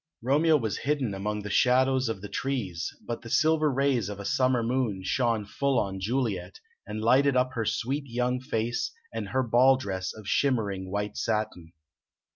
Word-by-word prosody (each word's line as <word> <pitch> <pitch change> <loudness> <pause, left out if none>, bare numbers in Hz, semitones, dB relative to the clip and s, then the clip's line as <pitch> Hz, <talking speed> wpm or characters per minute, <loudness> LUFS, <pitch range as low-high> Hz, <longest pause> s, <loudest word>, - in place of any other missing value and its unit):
Romeo 150 +5 +4
was 110 -7 -2
hidden 140 -6 -1
among 105 +2 -3
the 105 - -5
shadows 130 +1 +3
of 110 -4 -4
the - - -4
trees, 100 -7 -3
but 120 0 -4
the 115 - -9
silver 155 +1 +3
rays 130 -6 +1
of 100 -1 -6
a 100 - -6
summer 130 +1 +2
moon 115 -5 -1
shone 115 +1 0
full 135 +5 0
on 95 -3 -1
Juliet, 100 -4 -2 0.3
and 110 +1 -4
lighted 130 +3 +4
up 125 +1 +1
her 115 -3 -2
sweet 135 +7 -1
young 125 +1 -1
face 115 -2 -2 0.2
and - - -4
her 130 0 +1
ball 125 +3 +5
dress 95 -7 -3
of 110 -2 -11
shimmering 100 -7 0
white 105 +1 -3
satin. 105 -7 -2
120 Hz, 175 wpm, -27 LUFS, 105-130 Hz, 0.3 s, ball